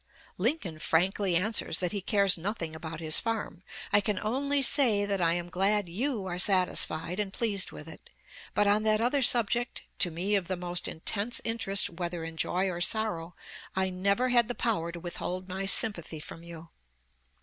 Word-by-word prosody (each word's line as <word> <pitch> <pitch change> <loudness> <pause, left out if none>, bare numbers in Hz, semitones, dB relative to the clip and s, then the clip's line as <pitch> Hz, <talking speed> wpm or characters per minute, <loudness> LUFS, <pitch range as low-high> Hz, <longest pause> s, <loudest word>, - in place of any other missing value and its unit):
Lincoln 195 - -2
frankly 185 +4 +1
answers 190 -2 +3
that 180 -1 -1
he 200 - -3
cares 200 -1 +2
nothing 170 -2 -4
about 160 0 -7
his 155 -1 +4
farm. 225 -6 -4 0.3
"I 205 - +6
can 205 0 -2
only 275 +5 0
say 235 -8 +4
that 200 -2 -2
I 165 -1 +3
am 175 0 -3
glad 195 +2 +1
you 220 +4 -2
are 180 -1 -3
satisfied 180 -2 +2
and 205 -2 -2
pleased 205 -3 -1
with 150 - -10
it. 160 - -13 0.5
But 210 - +3
on 205 +1 +3
that 215 0 +2
other 250 +5 +1
subject, 240 0 +1 0.2
to 180 - +5
me 175 +5 -3
of 195 -4 +1
the 185 -1 -3
most 175 0 -2
intense 205 +8 0
interest 225 -3 +2
whether 175 -2 -5
in 165 0 -7
joy 180 +3 0
or 175 -2 -4
sorrow, 180 -5 -1 0.4
I 190 0 0
never 200 +7 0
had 240 -2 +4
the 245 - -4
power 190 -8 -1
to 170 - -8
withhold 180 +1 -5
my 190 +1 -4
sympathy 170 -6 +2
from 165 +2 -10
you. 170 -1 -11
190 Hz, 180 wpm, -28 LUFS, 175-215 Hz, 0.5 s, I